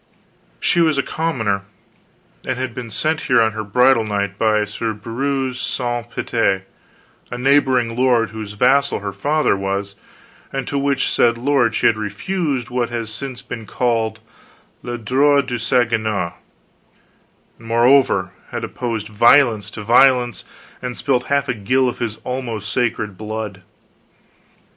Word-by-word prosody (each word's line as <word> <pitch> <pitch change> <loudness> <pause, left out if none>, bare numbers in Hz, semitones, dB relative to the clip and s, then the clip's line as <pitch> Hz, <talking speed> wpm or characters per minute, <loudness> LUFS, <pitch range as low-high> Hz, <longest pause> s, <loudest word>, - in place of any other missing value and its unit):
She 170 - +2
was 160 -3 +3
a 140 - +2
commoner, 115 -12 -1 0.8
and 130 - -3
had 130 -2 -3
been 120 -1 -6
sent 155 +8 -1
here - - +5
on 110 -1 +3
her 110 0 -5
bridal 125 +3 +4
night 100 -2 -2
by 110 -1 +2
Sir 110 +2 -3
Breuse 130 +4 -3
Sance 120 -2 -3
Pite, 100 -6 0 0.7
a 125 - -5
neighboring 130 -3 +2
lord 120 -4 +2
whose 110 -2 -7
vassal 135 +3 +2
her 100 -1 -4
father 145 - +1
was, 100 +1 -3 0.6
and 135 - -4
to 140 - -1
which 140 -1 +1
said 115 -1 +2
lord 125 -3 +2
she - - 0
had 110 - +4
refused 130 - -3
what 125 -1 0
has 115 -2 -4
since 130 0 -6
been 115 -3 -7
called 115 -2 -1 0.6
le 120 0 -5
droit 140 +5 +3
du 120 -2 -3
seigneur, 115 -6 0 1.3
and, 115 - -13
moreover, 115 -5 +3 0.2
had - - -5
opposed 115 -4 -4
violence 110 -1 +4
to 105 - -8
violence 125 +1 +4 0.4
and 125 -1 -5
spilt 130 -3 0
half 140 0 +1
a 125 - 0
gill 125 +5 +1
of 125 - -3
his 110 -3 -3
almost 115 -5 -4
sacred 110 -5 -1
blood. 110 -2 -5
120 Hz, 145 wpm, -19 LUFS, 110-130 Hz, 1.3 s, here